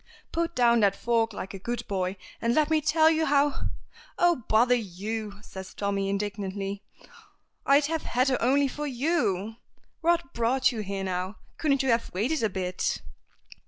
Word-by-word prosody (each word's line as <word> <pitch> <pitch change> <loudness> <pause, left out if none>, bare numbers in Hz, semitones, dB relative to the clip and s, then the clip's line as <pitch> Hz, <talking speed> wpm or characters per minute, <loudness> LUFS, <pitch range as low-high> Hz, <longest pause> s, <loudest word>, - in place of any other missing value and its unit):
"Put 335 0 -1
down 235 -1 +4
that 200 -2 +3
fork 230 0 +1
like 195 -2 -6
a 195 - -7
good 240 +5 -4
boy, 190 -1 -2 0.2
and 235 +1 +1
let 310 0 +2
me 310 -1 +3
tell 315 +1 +4
you 320 0 +1
how 285 0 +2 0.3
" - - -24
"Oh, 335 -10 +2
bother 235 +3 +5
you!" 210 -1 -3
says 190 -2 -9
Tommy, 200 -1 -1
indignantly. 200 0 -3 0.8
"I'd 280 +1 +5
have 320 +1 -1
had 255 +3 +1
her 260 - 0
only 275 +4 +3
for 295 +3 -4
you! 240 - 0 0.4
What 335 -4 +1
brought 250 +3 +2
you 230 - -5
here 200 -2 -3
now? 185 +1 -2 0.2
Couldn't 280 -3 +2
you 265 - 0
have 230 0 +1
waited 250 +10 0
a 220 - +2
bit?" 185 -1 -2
230 Hz, 170 wpm, -27 LUFS, 200-280 Hz, 0.8 s, bother